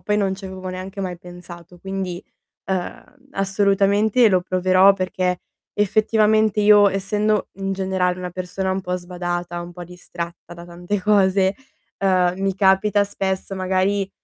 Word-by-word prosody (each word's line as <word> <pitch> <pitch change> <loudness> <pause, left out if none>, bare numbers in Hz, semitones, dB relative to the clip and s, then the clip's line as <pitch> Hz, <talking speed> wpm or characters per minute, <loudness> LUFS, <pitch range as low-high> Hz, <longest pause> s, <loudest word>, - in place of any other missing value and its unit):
poi 210 0 0
non 195 -2 0
ci 195 +1 -12
avevo 190 0 -7
neanche 185 +2 -6
mai 185 -2 -4
pensato 175 0 -12
quindi, 190 -2 -5 0.4
ehm, 255 +9 -5
assolutamente 200 +3 +3
lo 185 -2 +2
proverò, 185 +2 +4
perché 185 -1 -2 0.3
effettivamente, 215 +1 +2
io 205 -1 +6
essendo, 210 +2 0
mhmm, 195 0 -6
in - - 0
generale, 190 -1 -1
una 180 -1 -5
persona 185 +1 -3
un 190 0 -2
po' 180 0 -2
sbadata, 175 -1 -4
un 175 0 -10
po' 175 0 -9
distratta 175 -1 -8
da 170 0 -11
tante 175 +4 -4
cose, 195 -1 +3 0.4
ehm, 185 -2 +2
mi 195 0 -1
capita 200 +2 +3
spesso 195 -1 -3
magari, 190 +1 0
190 Hz, 150 wpm, -21 LUFS, 180-200 Hz, 0.4 s, io